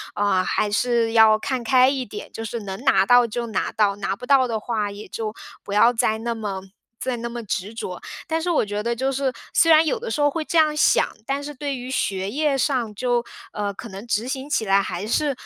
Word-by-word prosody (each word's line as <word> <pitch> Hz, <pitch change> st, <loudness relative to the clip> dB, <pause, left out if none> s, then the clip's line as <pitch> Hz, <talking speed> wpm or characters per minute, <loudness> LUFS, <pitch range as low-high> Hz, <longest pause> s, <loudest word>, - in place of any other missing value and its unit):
呃， 200 Hz, -2 st, +2 dB
还 205 Hz, -, 0 dB
是 230 Hz, +1 st, +1 dB
要 220 Hz, -1 st, +6 dB
看 255 Hz, +2 st, -2 dB
开 255 Hz, +3 st, +5 dB
一 270 Hz, -2 st, -2 dB
点， 210 Hz, 0 st, -9 dB
就 225 Hz, -, -6 dB
是 225 Hz, +1 st, -4 dB
能 195 Hz, -1 st, -6 dB
拿 190 Hz, 0 st, +4 dB
到 245 Hz, +1 st, +5 dB
就 235 Hz, +1 st, -4 dB
拿 220 Hz, -, -2 dB
到， 205 Hz, -2 st, +2 dB
拿 195 Hz, -1 st, -2 dB
不 250 Hz, -, -9 dB
到 265 Hz, -1 st, +4 dB
的 225 Hz, -, -1 dB
话 215 Hz, -1 st, -2 dB
也 205 Hz, +1 st, -9 dB
就 215 Hz, -2 st, -4 dB, 0.3 s
不 200 Hz, -, -6 dB
要 230 Hz, +4 st, +6 dB
再 220 Hz, -1 st, +1 dB
那 235 Hz, +1 st, -3 dB
么 200 Hz, -4 st, -4 dB, 0.4 s
再 255 Hz, -2 st, -2 dB
那 235 Hz, +1 st, -4 dB
么 240 Hz, 0 st, -5 dB
执 200 Hz, +2 st, -3 dB
着。 180 Hz, -5 st, -6 dB, 0.3 s
但 325 Hz, -1 st, -1 dB
是 355 Hz, -, -2 dB
我 310 Hz, -, +2 dB
觉 205 Hz, 0 st, -3 dB
得 235 Hz, +1 st, 0 dB
就 265 Hz, +3 st, -1 dB
是， 270 Hz, 0 st, 0 dB, 0.2 s
虽 330 Hz, -, +5 dB
然 315 Hz, 0 st, +7 dB
有 465 Hz, -, 0 dB
的 475 Hz, +1 st, -5 dB
时 -, -, -2 dB
候 290 Hz, 0 st, +4 dB
会 315 Hz, +2 st, -3 dB
这 335 Hz, -, -1 dB
样 310 Hz, -1 st, +4 dB
想， 300 Hz, -, +4 dB, 0.2 s
但 275 Hz, +2 st, -2 dB
是 295 Hz, 0 st, -7 dB
对 285 Hz, +1 st, -3 dB
于 250 Hz, 0 st, -7 dB
学 195 Hz, -6 st, -1 dB
业 290 Hz, +2 st, 0 dB
上， 245 Hz, -6 st, 0 dB
就， 240 Hz, +2 st, 0 dB, 0.3 s
呃， 205 Hz, -1 st, -2 dB
可 230 Hz, -, -9 dB
能 195 Hz, +3 st, -9 dB
执 230 Hz, 0 st, -1 dB
行 270 Hz, +2 st, -4 dB
起 225 Hz, -, 0 dB
来 195 Hz, 0 st, +4 dB
还 185 Hz, +2 st, -4 dB
是， 290 Hz, +5 st, +1 dB
235 Hz, 260 characters per minute, -23 LUFS, 210-270 Hz, 0.4 s, 然